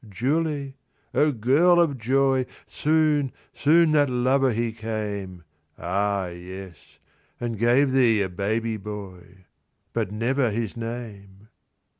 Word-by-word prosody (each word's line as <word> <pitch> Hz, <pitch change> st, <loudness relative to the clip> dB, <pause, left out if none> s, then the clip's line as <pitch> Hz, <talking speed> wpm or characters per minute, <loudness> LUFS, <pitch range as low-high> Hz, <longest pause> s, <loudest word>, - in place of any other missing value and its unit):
Julie, 140 Hz, -, -1 dB, 0.4 s
O 150 Hz, 0 st, +3 dB
girl 145 Hz, +9 st, +4 dB
of 145 Hz, -6 st, +2 dB
joy, 130 Hz, +2 st, +2 dB, 0.2 s
Soon, 150 Hz, -3 st, +1 dB, 0.2 s
soon 160 Hz, +2 st, +4 dB
that 145 Hz, -2 st, +3 dB
lover 130 Hz, +2 st, +2 dB
he 115 Hz, +1 st, -1 dB
came. 105 Hz, -5 st, -5 dB, 0.3 s
Ah, 100 Hz, +1 st, -1 dB
yes; 90 Hz, 0 st, -11 dB, 0.4 s
and 120 Hz, -1 st, -3 dB
gave 120 Hz, +5 st, +3 dB
thee 120 Hz, -6 st, +4 dB
a -, -, -1 dB
baby 110 Hz, +4 st, -2 dB
boy, 95 Hz, -3 st, -9 dB, 0.5 s
But 110 Hz, -4 st, -1 dB
never 120 Hz, +4 st, 0 dB
his 110 Hz, 0 st, -3 dB
name 110 Hz, -4 st, -8 dB
115 Hz, 115 wpm, -24 LUFS, 100-135 Hz, 0.5 s, girl